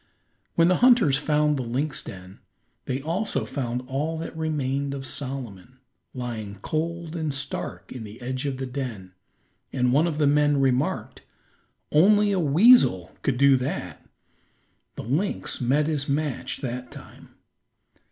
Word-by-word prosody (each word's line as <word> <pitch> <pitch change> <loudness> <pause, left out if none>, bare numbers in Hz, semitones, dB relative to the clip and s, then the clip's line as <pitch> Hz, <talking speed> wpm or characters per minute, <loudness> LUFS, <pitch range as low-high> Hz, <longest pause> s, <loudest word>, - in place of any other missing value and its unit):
When 165 0 +5
the 180 0 +3
hunters 235 - +5
found 150 -1 +1
the - - -1
lynx 130 +4 -2
den, 95 0 -10 0.5
they 130 +1 -3
also 180 +7 -1
found 125 -2 -3
all 150 +5 -2
that 165 0 -6
remained 140 -3 -2
of 135 -1 -6
Solomon 130 -5 -4 0.4
lying 110 -5 -5
cold 165 +1 -3
and 160 -3 -2
stark 140 0 -4
in 125 - -7
the 105 +1 -10
edge 130 +2 -3
of 135 -2 -3
the 135 - -3
den. 125 -8 -5 0.6
And 125 -1 +1
one 155 +5 +4
of 155 -3 -2
the 150 - +2
men 145 0 +3
remarked: 135 +1 0 0.7
"Only 205 +6 +5
a 195 - +1
weasel 150 - +5
could 130 -3 0
do 140 +1 +6
that. 125 - -4 0.9
The - - -6
lynx 150 - -1
met 135 +5 +2
his 150 -2 -1
match 145 -1 -2
that 125 -1 -4
time." - - -14
140 Hz, 145 wpm, -25 LUFS, 125-155 Hz, 0.9 s, do